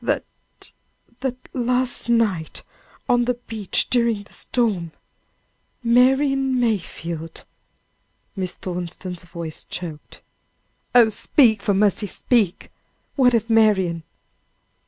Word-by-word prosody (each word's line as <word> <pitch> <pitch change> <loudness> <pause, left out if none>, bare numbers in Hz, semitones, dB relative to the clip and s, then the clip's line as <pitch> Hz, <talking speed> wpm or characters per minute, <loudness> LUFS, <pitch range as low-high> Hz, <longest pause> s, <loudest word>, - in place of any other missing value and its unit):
"That, - - 0 1.0
that 260 -1 -3 0.2
last 250 0 0
evening 210 -9 +2 0.6
on 245 -1 +3
the 250 0 0
beach 225 -5 -1
during 235 -4 +2
the - - -20
storm, 195 -10 -1 0.9
Marian 265 +2 +3
Mayfield 170 -7 -3 0.4
" - - -45
Miss 185 -2 -3
Thornton's 180 0 -6
voice 170 -2 -7
choked. 160 -4 -8 0.7
"Oh, 235 -2 +7
speak; 220 0 +3
for 200 0 +1
mercy 205 +1 +2
speak! 205 -2 0 0.4
What 250 -3 +4
of 230 0 0
Marian?" 205 -7 +3
220 Hz, 100 wpm, -22 LUFS, 180-245 Hz, 1.0 s, Oh